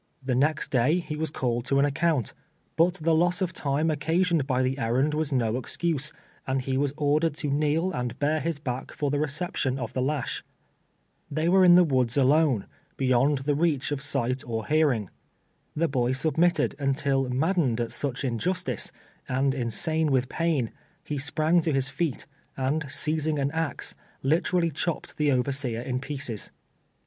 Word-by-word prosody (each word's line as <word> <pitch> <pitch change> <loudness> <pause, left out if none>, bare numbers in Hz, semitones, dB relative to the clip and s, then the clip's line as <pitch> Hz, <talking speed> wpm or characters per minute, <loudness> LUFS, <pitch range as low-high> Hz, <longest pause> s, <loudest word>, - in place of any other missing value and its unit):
The 130 -1 -1
next 145 +4 +1
day 130 +6 +3
he 155 -4 -4
was 155 0 -2
called 120 -4 -1
to 135 +1 +1
an 140 - +4
account, 145 -3 0 0.4
but 175 +3 +3
the 165 -2 +1
loss 175 +2 +2
of 185 -2 -1
time 150 +2 0
oc 150 - -2
casioned 165 -1 +1
by 130 -2 +1
the 130 +2 -1
errand 130 +6 +1
was 155 -1 -1
no 120 -3 +1
excuse, 150 +3 -1 0.4
and 135 0 +1
he 130 0 -2
was 140 +1 +1
ordered 150 +1 +1
to 150 -2 -2
kneel 155 +5 +1
and 125 -5 -3
bare 150 +2 +1
his 165 0 -2
back 130 -3 -5
for 145 -2 -1
the 145 - 0
reception 150 -3 -1
of 120 -4 -5
the 130 - -1
lash. 140 0 -2 0.9
Tliey 155 +3 0
were 190 +1 +5
in 175 -1 +8
the 180 - +7
woods 130 -5 +1
alone 140 -5 +3 0.2
— - - -39
beyond 135 +2 +2
the 145 - +2
reach 150 -2 +1
of 145 -2 -2
sight 130 -1 0
or 115 -4 -4
hearing. 145 - +1 0.6
The 165 +2 +1
boy 125 -3 0
submitted 160 +3 +2
until 135 -1 +1
maddened 135 -2 +1
at 120 -1 -2
such 135 -2 -3
injustice, 130 - -1 0.4
and 135 +1 +1
insane 145 +6 0
with 130 -1 +1
pain, 160 -8 0 0.3
he 145 -2 -3
sprang 160 +4 +2
to 160 -1 0
his 135 -1 +1
feet, 160 -2 -2 0.3
and 140 +3 -1
seizing 155 +1 0
an 140 0 0
axe, 160 -3 -2 0.3
liter 160 +6 +2
ally 170 -1 +2
chopped 160 +2 -3
the 150 -1 +2
overseer 130 -2 0
in 125 0 -2
pieces. 135 -6 -4
145 Hz, 175 wpm, -26 LUFS, 130-160 Hz, 0.9 s, in